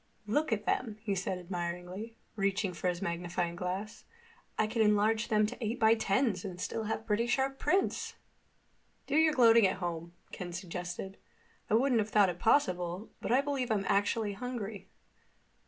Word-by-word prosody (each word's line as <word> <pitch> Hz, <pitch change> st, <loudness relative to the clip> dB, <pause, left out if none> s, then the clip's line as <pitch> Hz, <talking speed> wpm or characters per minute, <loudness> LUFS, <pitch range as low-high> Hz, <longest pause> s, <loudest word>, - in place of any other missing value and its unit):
"Look 290 Hz, +9 st, 0 dB
at 210 Hz, -1 st, -1 dB
them," 220 Hz, -4 st, -1 dB
he 205 Hz, -3 st, 0 dB
said 190 Hz, -1 st, -2 dB
admiringly, 180 Hz, +4 st, -5 dB, 0.2 s
reaching 195 Hz, -2 st, 0 dB
for 180 Hz, -, -3 dB
his 180 Hz, +1 st, -1 dB
magnifying 170 Hz, -1 st, -2 dB
glass. 185 Hz, +4 st, -4 dB, 0.5 s
"I 215 Hz, -, +3 dB
could 225 Hz, +1 st, -1 dB
enlarge 215 Hz, +1 st, +3 dB
them 215 Hz, -2 st, +3 dB
to 240 Hz, +3 st, -5 dB
eight 225 Hz, +3 st, -2 dB
by 220 Hz, 0 st, +6 dB
tens 210 Hz, -2 st, +1 dB
and 180 Hz, -3 st, -6 dB
still 220 Hz, +4 st, -3 dB
have 220 Hz, +1 st, -3 dB
pretty 225 Hz, +3 st, +1 dB
sharp 270 Hz, +2 st, 0 dB
prints!" 385 Hz, +1 st, 0 dB, 0.9 s
"Do 285 Hz, -, -2 dB
your 315 Hz, 0 st, +4 dB
gloating 230 Hz, -4 st, +7 dB
at 185 Hz, -, -2 dB
home," 170 Hz, -2 st, -4 dB, 0.2 s
Ken 175 Hz, -1 st, -6 dB
suggested. 180 Hz, +2 st, -5 dB, 0.5 s
"I 215 Hz, -, +4 dB
wouldn't 245 Hz, 0 st, +3 dB
have 210 Hz, -, -3 dB
thought 205 Hz, -3 st, +5 dB
it 175 Hz, 0 st, -5 dB
possible, 180 Hz, -5 st, +1 dB
but -, -, -3 dB
I 255 Hz, +3 st, +5 dB
believe 275 Hz, -3 st, -2 dB
I'm 205 Hz, -3 st, 0 dB
actually 205 Hz, +1 st, +1 dB
hungry." 215 Hz, -4 st, -6 dB
210 Hz, 170 wpm, -31 LUFS, 180-230 Hz, 0.9 s, gloating